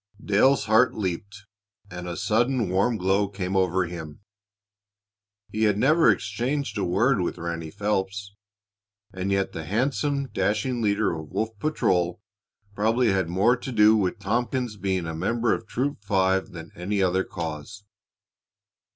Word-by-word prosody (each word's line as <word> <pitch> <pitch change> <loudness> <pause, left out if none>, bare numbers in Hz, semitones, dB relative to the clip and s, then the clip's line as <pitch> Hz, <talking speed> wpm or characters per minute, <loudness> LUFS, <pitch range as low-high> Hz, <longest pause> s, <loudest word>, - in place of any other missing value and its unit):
Dale's 105 +4 +3
heart 110 +4 +4
leaped, 100 +1 -4 0.5
and 90 0 -6
a 85 - -5
sudden 120 -1 +1
warm 100 +6 +1
glow 95 +2 +1
came 95 -1 -4
over 95 -1 +2
him. 85 -1 -8 1.3
He 110 +1 +1
had 105 -2 +2
never 155 +8 +4
exchanged 120 +3 -1
a - - 0
word 100 +5 +2
with 90 - -2
Ranny 85 -1 -4
Phelps, 100 +1 -2 0.8
and 95 +1 -3
yet 100 0 0
the 80 - -6
handsome, 135 - -1
dashing 110 +6 -1
leader 105 -2 +1
of 80 -2 -7
Wolf 110 - -1
patrol 90 - 0 0.5
probably 110 +3 +2
had 95 -3 0
more 100 +8 +3
to 130 - -6
do 110 -1 +5
with 95 -4 0
Tompkins' 120 +2 -1
becoming 95 -3 -1
a 80 - -4
member 115 +8 +1
of 115 - -4
Troop 130 -3 -2
Five 95 -1 +1
than 85 -1 -9
any 100 +3 -1
other 95 +1 +2
cause. 85 +4 -6
100 Hz, 145 wpm, -25 LUFS, 90-115 Hz, 1.3 s, do